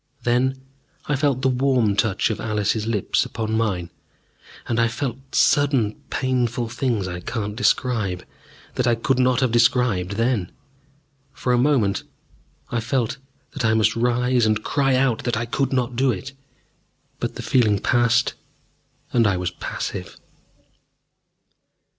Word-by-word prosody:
Then 125 +2 +1 0.5
I 145 - 0
felt 135 -2 0
the - - +4
warm 125 -5 +2
touch 110 +1 +1
of 110 - -4
Alice's 105 0 -1
lips 105 -4 +1
upon 110 0 -3
mine, 95 -7 -1 0.8
and 115 -1 0
I 115 - +4
felt 130 +2 -5
sudden 135 -7 +3 0.2
painful 125 -3 -1
things 115 -5 -1
I 90 -1 -5
cannot 105 +2 -4
describe, 110 -7 0 0.5
that 125 - 0
I 120 - +4
could 125 +3 0
not 130 0 +3
have 130 -3 +2
described 115 -5 +2
then. 115 -3 0 0.8
For 125 - -1
a - - +3
moment 125 -7 +2 0.7
I 120 - 0
felt 115 +2 -1 0.4
that 140 - -4
I 110 -1 +3
must 110 -1 +2
rise 125 0 +2
and 110 0 0
cry 135 -2 +1
out 130 -3 +1
that 120 -3 -1
I 115 - -1
could 135 +3 -1
not 125 -2 -1
do 130 +1 +2
it. 125 +6 -6 0.9
But - - -3
the - - -6
feeling 110 -5 +3
passed, 120 +3 +2 0.8
and 115 -3 +4
I 100 -2 +1
was 90 0 -2
passive. - - -5
120 Hz, 145 wpm, -22 LUFS, 110-130 Hz, 0.9 s, the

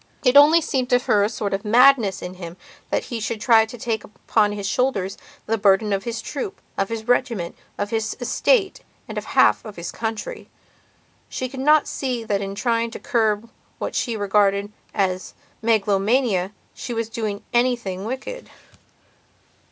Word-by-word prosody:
It 250 +1 +4
only 300 +4 +8
seemed 265 -5 -1
to 245 - +5
her 210 -4 +2
a 205 - +1
sort 210 -3 -3
of 195 +1 -2
madness 230 -2 +4
in 180 - -5
him 175 -1 -9 0.3
that - - 0
he 235 -4 -5
should 220 0 -3
try 225 -1 +5
to 245 - -9
take 220 -2 -2
upon 210 0 0
his 205 -1 -5
own - - 0
shoulders 200 -7 0 0.3
the 225 0 -1
burden 200 +1 +3
of 195 0 -2
his 235 -1 -4
troop, 265 -9 -5 0.2
of 195 - -1
his 225 0 -5
regiment, 235 -8 0 0.2
of 205 0 -3
his 220 -1 -2
estate 385 - +1 0.3
and - - -7
of - - -10
half - - +3
of 215 -3 -9
his 170 -1 -6
country. 225 -2 -5 0.8
She 255 - -3
could 265 +1 -9
not 300 +2 +4
see 250 -4 -3
that 205 -3 -1
in 195 0 -4
trying 230 +1 0
to - - -8
curb 225 -4 0 0.3
what - - -4
she 235 -3 -1
regarded 200 0 +2 0.2
as 185 -2 -1 0.3
megalomania 210 -2 +2 0.2
she 240 - -6
was 225 -1 -1
doing 215 -3 -4
anything 240 -6 0
wicked. 265 - -6
220 Hz, 175 wpm, -22 LUFS, 200-245 Hz, 0.8 s, only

